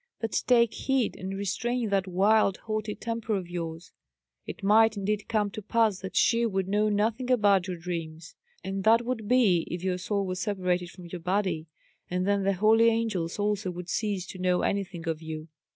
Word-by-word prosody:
But 225 Hz, -2 st, -3 dB, 0.2 s
take 235 Hz, -2 st, +4 dB
heed, 265 Hz, -4 st, 0 dB
and 190 Hz, +1 st, -5 dB
restrain 235 Hz, +4 st, -1 dB
that 195 Hz, -1 st, +1 dB
wild, 195 Hz, +2 st, +3 dB
haughty 215 Hz, -1 st, -2 dB
temper 230 Hz, -1 st, -3 dB
of 185 Hz, -3 st, -3 dB
yours. 165 Hz, -1 st, -6 dB, 0.6 s
It 220 Hz, -, -8 dB
might, 220 Hz, +2 st, +5 dB
indeed, 205 Hz, +1 st, -2 dB
come 210 Hz, -2 st, +1 dB
to 215 Hz, -, -6 dB
pass 215 Hz, -2 st, +1 dB
that 190 Hz, -, -7 dB
she 235 Hz, 0 st, +3 dB
would 195 Hz, -5 st, 0 dB
know 210 Hz, +2 st, +2 dB
nothing 220 Hz, +4 st, 0 dB
about 205 Hz, -6 st, +3 dB
your 180 Hz, -1 st, -4 dB
dreams, 165 Hz, -2 st, -6 dB, 0.3 s
and 195 Hz, +1 st, -3 dB
that 230 Hz, +3 st, +4 dB
would 230 Hz, -4 st, -3 dB
be 215 Hz, -9 st, +3 dB
if 175 Hz, 0 st, -5 dB
your 185 Hz, -1 st, -1 dB
soul 200 Hz, +1 st, -1 dB
were 185 Hz, -, -2 dB
separated 180 Hz, -3 st, -1 dB
from 180 Hz, 0 st, -12 dB
your 170 Hz, 0 st, -7 dB
body; 180 Hz, -3 st, -1 dB, 0.4 s
and 180 Hz, +1 st, -1 dB
then 200 Hz, 0 st, +2 dB
the 195 Hz, 0 st, +1 dB
holy 220 Hz, +4 st, +4 dB
angels 220 Hz, -7 st, -1 dB
also 205 Hz, -2 st, -1 dB
would 180 Hz, 0 st, -7 dB
cease 200 Hz, -3 st, -1 dB
to 185 Hz, -, -8 dB
know 180 Hz, -1 st, +1 dB
anything 180 Hz, -4 st, -2 dB
of 160 Hz, -1 st, -2 dB
you." 160 Hz, 0 st, -7 dB
200 Hz, 190 wpm, -27 LUFS, 180-220 Hz, 0.6 s, might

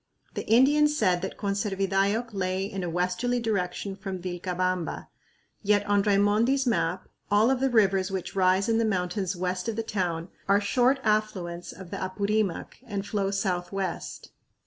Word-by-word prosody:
The -, -, -5 dB
Indians 295 Hz, +6 st, +4 dB
said 180 Hz, -7 st, +2 dB
that 190 Hz, -, -5 dB
Conservidayoc 200 Hz, +2 st, 0 dB
lay 190 Hz, 0 st, -1 dB
in 195 Hz, -2 st, -5 dB
a 175 Hz, -, -2 dB
westerly 180 Hz, +9 st, 0 dB
direction 195 Hz, -3 st, -2 dB
from 190 Hz, -2 st, -5 dB
Vilcabamba, 180 Hz, 0 st, -2 dB, 0.5 s
yet 205 Hz, -1 st, +2 dB
on 205 Hz, 0 st, +3 dB
Raimondi's 210 Hz, +7 st, +3 dB
map 185 Hz, -6 st, 0 dB, 0.2 s
all 210 Hz, +5 st, +4 dB
of 265 Hz, -, +1 dB
the 270 Hz, +1 st, +2 dB
rivers 195 Hz, -5 st, +3 dB
which 190 Hz, -1 st, -4 dB
rise 190 Hz, 0 st, +3 dB
in 225 Hz, 0 st, +2 dB
the -, -, +2 dB
mountains 190 Hz, -2 st, -1 dB
west 180 Hz, +3 st, -2 dB
of 225 Hz, -, -3 dB
the 225 Hz, -, -2 dB
town 175 Hz, -5 st, -2 dB, 0.2 s
are 200 Hz, +1 st, +5 dB
short 250 Hz, +6 st, +2 dB
affluents 195 Hz, -5 st, -1 dB
of 185 Hz, -2 st, -11 dB
the -, -, -4 dB
Apurimac 200 Hz, 0 st, -1 dB
and 200 Hz, -2 st, -3 dB
flow 200 Hz, -2 st, -1 dB
southwest. 195 Hz, -1 st, -3 dB
195 Hz, 155 wpm, -27 LUFS, 185-215 Hz, 0.5 s, are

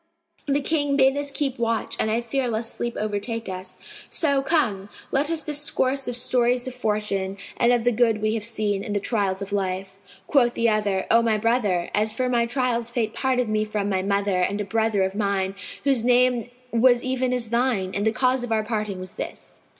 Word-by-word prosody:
The 285 Hz, +1 st, +1 dB
King 290 Hz, -1 st, +1 dB
bade 265 Hz, 0 st, +4 dB
us 285 Hz, 0 st, -3 dB
keep 270 Hz, -2 st, -2 dB
watch 230 Hz, -1 st, -1 dB
and 220 Hz, -, +1 dB
I 225 Hz, +2 st, +1 dB
fear 250 Hz, +2 st, -1 dB
lest 225 Hz, 0 st, -1 dB
sleep 235 Hz, 0 st, -4 dB
overtake 215 Hz, +2 st, -2 dB
us; 185 Hz, 0 st, -8 dB
so, 280 Hz, -4 st, +2 dB
come, 220 Hz, -, 0 dB, 0.2 s
let 285 Hz, +3 st, +2 dB
us 330 Hz, -1 st, -1 dB
discourse 280 Hz, -2 st, 0 dB
of 245 Hz, -, -2 dB
stories 245 Hz, 0 st, +2 dB
of 255 Hz, -, -4 dB
fortune 210 Hz, -5 st, -2 dB, 0.2 s
and 235 Hz, -, +4 dB
of 240 Hz, -2 st, +2 dB
the 245 Hz, -, +3 dB
good 225 Hz, -2 st, +2 dB
we 215 Hz, +1 st, 0 dB
have 225 Hz, -2 st, -2 dB
seen 210 Hz, -3 st, -1 dB
and 205 Hz, -, -4 dB
the -, -, +2 dB
trials 200 Hz, -2 st, -1 dB
of 200 Hz, -, -9 dB
life." 190 Hz, -1 st, -2 dB, 0.3 s
Quoth 240 Hz, -2 st, +3 dB
the 235 Hz, -, +2 dB
other, 205 Hz, -3 st, 0 dB
"O 230 Hz, -, +6 dB
my 225 Hz, -2 st, +2 dB
brother, 210 Hz, -6 st, +1 dB
as 215 Hz, +1 st, +1 dB
for 255 Hz, +2 st, -1 dB
my 235 Hz, -1 st, +2 dB
trials 240 Hz, -2 st, 0 dB
Fate 230 Hz, -3 st, -1 dB
parted 255 Hz, -2 st, 0 dB
me 215 Hz, 0 st, +1 dB
from 210 Hz, -1 st, -2 dB
my 190 Hz, -2 st, +1 dB
mother 200 Hz, -1 st, 0 dB
and 200 Hz, +3 st, 0 dB
a 205 Hz, -, -2 dB
brother 220 Hz, -1 st, +1 dB
of 190 Hz, 0 st, -1 dB
mine, 200 Hz, -2 st, 0 dB, 0.3 s
whose 270 Hz, -5 st, +2 dB
name 245 Hz, -1 st, +3 dB, 0.2 s
was 240 Hz, +1 st, +4 dB
even 255 Hz, -1 st, 0 dB
as 245 Hz, -3 st, -1 dB
thine; 235 Hz, -6 st, +1 dB
and 205 Hz, +2 st, 0 dB
the -, -, +4 dB
cause 255 Hz, +2 st, +1 dB
of 245 Hz, -, -5 dB
our 220 Hz, -1 st, +2 dB
parting 210 Hz, -3 st, -3 dB
was 185 Hz, 0 st, -7 dB
this. -, -, -9 dB
230 Hz, 210 wpm, -24 LUFS, 205-250 Hz, 0.3 s, O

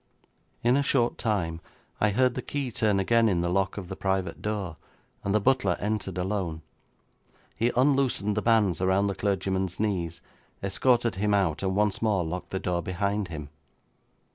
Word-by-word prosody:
'In 120 Hz, +2 st, +4 dB
a -, -, +3 dB
short 125 Hz, -4 st, +1 dB
time 85 Hz, -8 st, -1 dB, 0.4 s
I 105 Hz, -, +3 dB
heard 125 Hz, +4 st, +2 dB
the -, -, -3 dB
key 140 Hz, -3 st, -3 dB
turn 105 Hz, -3 st, +1 dB
again 115 Hz, +3 st, +3 dB
in 90 Hz, -3 st, +1 dB
the 85 Hz, 0 st, 0 dB
lock 95 Hz, +1 st, 0 dB
of 95 Hz, -3 st, -5 dB
the 95 Hz, -, -6 dB
private 95 Hz, -1 st, -2 dB
door, 100 Hz, -6 st, -3 dB, 0.5 s
and 100 Hz, -, -1 dB
the 105 Hz, -, +3 dB
butler 105 Hz, -5 st, +2 dB
entered 105 Hz, -3 st, -2 dB
alone. 90 Hz, -4 st, -2 dB, 1.0 s
He 120 Hz, +2 st, +2 dB
unloosened 130 Hz, -6 st, +2 dB
the 105 Hz, -, 0 dB
bands 105 Hz, -7 st, +3 dB
around 95 Hz, +2 st, +3 dB
the 100 Hz, -, 0 dB
clergyman's 95 Hz, -2 st, -1 dB
knees, 90 Hz, -6 st, -1 dB, 0.4 s
escorted 115 Hz, +2 st, +2 dB
him 105 Hz, +1 st, +2 dB
out, 90 Hz, -6 st, +1 dB
and 95 Hz, -1 st, -1 dB
once 105 Hz, 0 st, +1 dB
more 105 Hz, -5 st, +2 dB
locked 90 Hz, +3 st, -5 dB
the 95 Hz, -, -2 dB
door 90 Hz, -1 st, -1 dB
behind 100 Hz, +3 st, -1 dB
him. 75 Hz, -4 st, -7 dB
100 Hz, 170 wpm, -27 LUFS, 90-110 Hz, 1.0 s, In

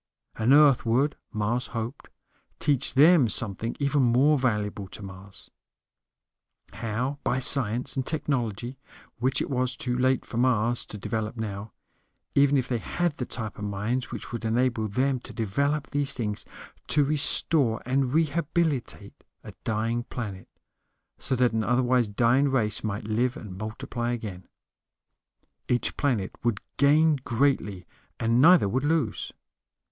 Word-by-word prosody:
And 115 Hz, +3 st, +1 dB
Earth 145 Hz, -3 st, +6 dB
would, 130 Hz, +6 st, +1 dB, 0.2 s
Mars 110 Hz, +4 st, -1 dB
hoped, 115 Hz, +4 st, -6 dB, 0.5 s
teach 140 Hz, -3 st, 0 dB
them 150 Hz, -3 st, +6 dB
something 115 Hz, +1 st, -3 dB
even 140 Hz, 0 st, +1 dB
more 130 Hz, +5 st, +4 dB
valuable 105 Hz, -6 st, -1 dB
to 100 Hz, -, -11 dB
Mars: 95 Hz, +1 st, -11 dB, 1.2 s
how, 125 Hz, +6 st, -3 dB
by 125 Hz, -, 0 dB
science 125 Hz, -2 st, +3 dB
and 135 Hz, -, -1 dB
technology 130 Hz, -4 st, -2 dB, 0.4 s
which 130 Hz, +2 st, +1 dB
it -, -, -6 dB
was 130 Hz, -1 st, -1 dB
too 125 Hz, -1 st, -2 dB
late 130 Hz, +1 st, +1 dB
for 115 Hz, -, -7 dB
Mars 120 Hz, -1 st, +1 dB
to 105 Hz, -, -7 dB
develop 110 Hz, +3 st, -4 dB
now, 105 Hz, -1 st, -5 dB, 0.6 s
even 140 Hz, 0 st, +4 dB
if 125 Hz, -2 st, -1 dB
they 120 Hz, -2 st, -1 dB
had 175 Hz, +8 st, -1 dB
the 125 Hz, -, -4 dB
type 110 Hz, -4 st, -4 dB
of -, -, -6 dB
minds 105 Hz, +6 st, -2 dB
which 115 Hz, -, -7 dB
would 120 Hz, 0 st, -5 dB
enable 115 Hz, -1 st, 0 dB
them 130 Hz, +5 st, 0 dB
to -, -, -11 dB
develop 140 Hz, +7 st, -1 dB
these 145 Hz, -1 st, +1 dB
things 105 Hz, -4 st, -2 dB, 0.4 s
to 150 Hz, -, +3 dB
restore 145 Hz, -4 st, +3 dB
and 130 Hz, 0 st, 0 dB
rehabilitate 160 Hz, -2 st, -1 dB, 0.2 s
a -, -, -10 dB
dying 115 Hz, +2 st, -1 dB
planet, 105 Hz, -8 st, -7 dB, 0.7 s
so 130 Hz, -, +1 dB
that 125 Hz, -2 st, +2 dB
an 110 Hz, -1 st, 0 dB
otherwise 125 Hz, 0 st, +2 dB
dying 120 Hz, +7 st, +2 dB
race 115 Hz, -6 st, 0 dB
might 110 Hz, +1 st, -3 dB
live 115 Hz, +4 st, -1 dB
and 100 Hz, -5 st, -9 dB
multiply 120 Hz, +2 st, -4 dB
again. 105 Hz, -6 st, -7 dB, 1.2 s
Each 125 Hz, -1 st, 0 dB
planet 120 Hz, -10 st, 0 dB
would 120 Hz, -4 st, 0 dB, 0.2 s
gain 150 Hz, +2 st, +4 dB
greatly, 115 Hz, -7 st, -1 dB, 0.3 s
and 115 Hz, +2 st, +2 dB
neither 170 Hz, -, +6 dB
would 130 Hz, +7 st, -1 dB
lose. 145 Hz, -8 st, -1 dB
125 Hz, 140 wpm, -26 LUFS, 110-140 Hz, 1.2 s, Earth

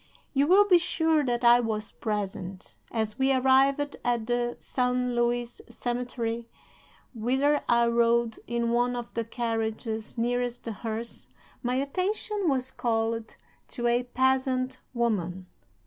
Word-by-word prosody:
"You 280 Hz, 0 st, +3 dB
will 400 Hz, +4 st, +6 dB
be 360 Hz, -3 st, +6 dB
sure 320 Hz, -2 st, +2 dB
that 240 Hz, -1 st, -1 dB
I 240 Hz, 0 st, +7 dB
was 220 Hz, -2 st, -2 dB
present. 195 Hz, -3 st, -4 dB, 0.2 s
As 220 Hz, 0 st, -2 dB
we 265 Hz, +1 st, +3 dB
arrived 270 Hz, +2 st, +3 dB
at 240 Hz, -2 st, 0 dB
the 240 Hz, 0 st, -1 dB
San 250 Hz, -1 st, 0 dB
Luis 240 Hz, 0 st, -1 dB
cemetery, 235 Hz, -1 st, -3 dB, 0.6 s
whither 265 Hz, +6 st, +1 dB
I 235 Hz, 0 st, +5 dB
rode 235 Hz, -1 st, +2 dB
in 235 Hz, 0 st, 0 dB
one 245 Hz, +1 st, +2 dB
of 240 Hz, -1 st, -6 dB
the 230 Hz, -, -1 dB
carriages 225 Hz, -1 st, -3 dB
nearest 245 Hz, +1 st, -1 dB
the 230 Hz, -, -4 dB
hearse, 225 Hz, +2 st, -5 dB, 0.3 s
my 250 Hz, 0 st, -1 dB
attention 370 Hz, +7 st, -1 dB
was 260 Hz, -1 st, -1 dB
called 225 Hz, -1 st, -1 dB, 0.3 s
to 240 Hz, -, -4 dB
a 240 Hz, +1 st, +3 dB
peasant 260 Hz, +1 st, 0 dB, 0.2 s
woman. 190 Hz, -6 st, -1 dB
240 Hz, 130 wpm, -27 LUFS, 230-260 Hz, 0.6 s, I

